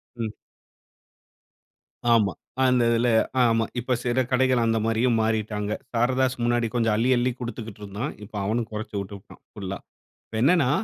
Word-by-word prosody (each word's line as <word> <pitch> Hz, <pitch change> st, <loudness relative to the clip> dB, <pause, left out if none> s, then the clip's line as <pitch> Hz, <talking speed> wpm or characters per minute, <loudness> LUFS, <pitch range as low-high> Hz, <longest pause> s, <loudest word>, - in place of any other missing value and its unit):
ம். 115 Hz, -2 st, -4 dB, 1.8 s
ஆமா. 105 Hz, -5 st, +4 dB, 0.3 s
அந்த 125 Hz, -2 st, +4 dB
இதுல 120 Hz, +1 st, +2 dB, 0.3 s
ஆமா. 115 Hz, -1 st, +3 dB
இப்ப 125 Hz, +1 st, 0 dB
சில 125 Hz, +1 st, +1 dB
கடைகள் 130 Hz, -2 st, +3 dB
அந்த 115 Hz, 0 st, +2 dB
மாதிரியும் 115 Hz, +1 st, +2 dB
மாறிட்டாங்க. 105 Hz, -1 st, -1 dB, 0.2 s
சாரதாஸ் 130 Hz, +2 st, +1 dB
முன்னாடி 120 Hz, -1 st, +2 dB
கொஞ்சம் 115 Hz, -3 st, +2 dB
அள்ளி, 120 Hz, +4 st, +1 dB
அள்ளி 125 Hz, +1 st, +1 dB
குடுத்துகிட்டு 115 Hz, -4 st, -6 dB
இருந்தான். 105 Hz, +8 st, -4 dB
இப்போ 105 Hz, 0 st, -8 dB
அவனும் 115 Hz, +2 st, -1 dB
குறைச்சுட்டு 100 Hz, -2 st, -5 dB
புட்டான் -, -, -17 dB
ஃபுல்லா. 95 Hz, -2 st, -5 dB, 0.5 s
இப்ப 110 Hz, -, -5 dB
என்னன்னா? 145 Hz, -1 st, +4 dB
115 Hz, 140 wpm, -25 LUFS, 110-125 Hz, 1.8 s, ஆமா